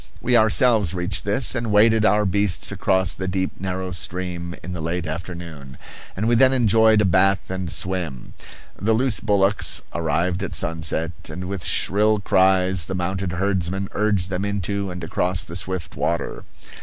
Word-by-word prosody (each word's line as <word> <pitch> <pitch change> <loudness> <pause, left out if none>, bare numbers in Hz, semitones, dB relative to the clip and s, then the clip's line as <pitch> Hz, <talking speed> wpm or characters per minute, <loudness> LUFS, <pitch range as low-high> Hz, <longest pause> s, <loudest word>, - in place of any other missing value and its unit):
We 125 - +1
ourselves 110 - +3
reached 90 +2 -3
this, 100 +1 +1
and 115 -3 -2
waded 110 +1 +4
our 105 -1 +3
beasts 100 -3 0
across 95 -1 +1
the 95 - -5
deep, 95 0 -1
narrow 95 0 -4
stream 90 -1 -4
in 90 - -6
the 85 - -5
late 85 +2 -3
afternoon; 80 -4 -7 0.4
and 105 +3 -1
we 120 - +3
then 130 +3 +5
enjoyed 110 -3 +4
a - - +2
bath 95 +1 +2
and 95 -3 -4
swim. 90 -8 -4 0.5
The 110 +3 +2
loose 125 +1 +2
bullocks 100 -1 +1
arrived 85 +3 -1
at 95 - -3
sunset, 80 0 -1 0.2
and 90 - -6
with 95 -1 -5
shrill 105 +2 +2
cries 95 -2 +3
the 95 - -4
mounted 90 0 -2
herdsmen 95 0 -1
urged 100 -4 0
them 95 +1 -2
into 100 0 -2
and 90 -1 -7
across 90 +2 -1
the 80 - -8
swift 95 -1 -3
water. 85 - -2
95 Hz, 165 wpm, -22 LUFS, 90-105 Hz, 0.5 s, then